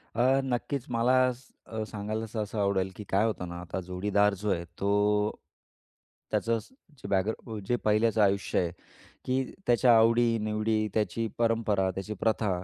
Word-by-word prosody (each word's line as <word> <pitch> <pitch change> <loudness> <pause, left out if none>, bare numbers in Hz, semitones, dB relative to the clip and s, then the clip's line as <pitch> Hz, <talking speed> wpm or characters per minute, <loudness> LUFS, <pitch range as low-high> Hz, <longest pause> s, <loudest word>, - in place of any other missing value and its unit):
अ, 130 +3 +3
नक्कीच 130 +1 -2
मला 120 +3 +3 0.2
स 125 +1 -19 0.2
अ, 110 -1 -4
सांगायला 110 +1 -4
सहसा 110 -1 -4
आवडेल, 95 -1 +1
की 105 - -7
काय 100 +3 +3
होतं 105 -5 -2
ना? 85 0 -6
आता 90 +1 -5
जोडीदार 100 +3 +1
जो 105 - -1
आहे 85 -2 -1
तो 100 - 0 1.4
त्याचं 115 0 +1
असं 185 - -11 0.2
जे - - -9
बॅग 95 +2 +2 0.4
जे 120 - +2
पहिल्याचं 110 +1 +3
आयुष्य 100 -1 +2
आहे, 85 -2 0 0.5
की 130 +1 +1 0.2
त्याच्या 120 0 +5
आवडी-निवडी, 110 -2 +2
त्याची 110 +2 0
परंपरा, 115 -4 +1
त्याची 95 +3 -5
प्रथा 110 -1 +1
110 Hz, 150 wpm, -28 LUFS, 100-115 Hz, 1.4 s, त्याच्या